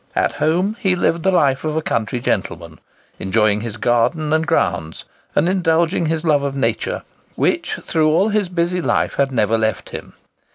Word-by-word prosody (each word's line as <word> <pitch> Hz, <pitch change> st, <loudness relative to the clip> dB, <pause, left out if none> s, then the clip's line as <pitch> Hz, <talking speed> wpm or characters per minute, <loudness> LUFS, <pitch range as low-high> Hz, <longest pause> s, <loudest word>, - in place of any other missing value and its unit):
At -, -, +2 dB
home 185 Hz, +7 st, 0 dB
he 190 Hz, -5 st, +1 dB
lived 170 Hz, -1 st, 0 dB
the 190 Hz, -, +2 dB
life 140 Hz, -7 st, +2 dB
of 155 Hz, -1 st, -2 dB
a -, -, +1 dB
country 115 Hz, +2 st, -1 dB
gentleman, 85 Hz, -, -3 dB, 0.4 s
enjoying 105 Hz, +1 st, +1 dB
his 115 Hz, -1 st, -6 dB
garden 125 Hz, +7 st, +1 dB
and 160 Hz, +1 st, +1 dB
grounds, 85 Hz, -, -1 dB, 0.3 s
and 155 Hz, -, +3 dB
indulging 170 Hz, -2 st, +1 dB
his 160 Hz, 0 st, -1 dB
love 150 Hz, -4 st, +3 dB
of 140 Hz, -1 st, -3 dB
nature, 115 Hz, -5 st, -1 dB, 0.3 s
which, -, -, 0 dB
through 155 Hz, -1 st, +1 dB
all 190 Hz, +7 st, +3 dB
his 205 Hz, -3 st, 0 dB
busy 175 Hz, 0 st, -1 dB
life, -, -, 0 dB
had 140 Hz, -1 st, +1 dB
never 115 Hz, -2 st, +1 dB
left 110 Hz, 0 st, -1 dB
him. -, -, -8 dB
155 Hz, 175 wpm, -19 LUFS, 115-170 Hz, 0.4 s, and